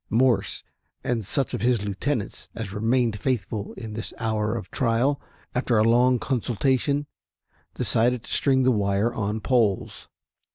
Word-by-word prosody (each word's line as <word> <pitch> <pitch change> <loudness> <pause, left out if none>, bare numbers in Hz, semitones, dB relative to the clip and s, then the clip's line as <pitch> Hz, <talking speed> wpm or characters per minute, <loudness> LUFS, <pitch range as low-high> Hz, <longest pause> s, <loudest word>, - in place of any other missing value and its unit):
Morse 115 -3 +2 0.4
and 120 -3 -1
such 130 +7 -1
of - - -2
his 120 -3 +2
lieutenants 105 +3 -3
as 105 -3 -5
remained 115 0 +1
faithful 110 -5 -2
in 110 -3 -7
this 110 +1 -5
hour 110 -1 0
of 110 - -8
trial, 130 +3 +1 0.3
after 125 -2 +1
a 105 - +5
long 125 +3 +4
consultation, 130 +4 0 0.7
decided 120 +1 +1
to - - -5
string 130 -2 +3
the 130 - +4
wire 100 +1 +1
on 105 0 -2
poles. 115 -7 0
115 Hz, 140 wpm, -25 LUFS, 105-125 Hz, 0.7 s, a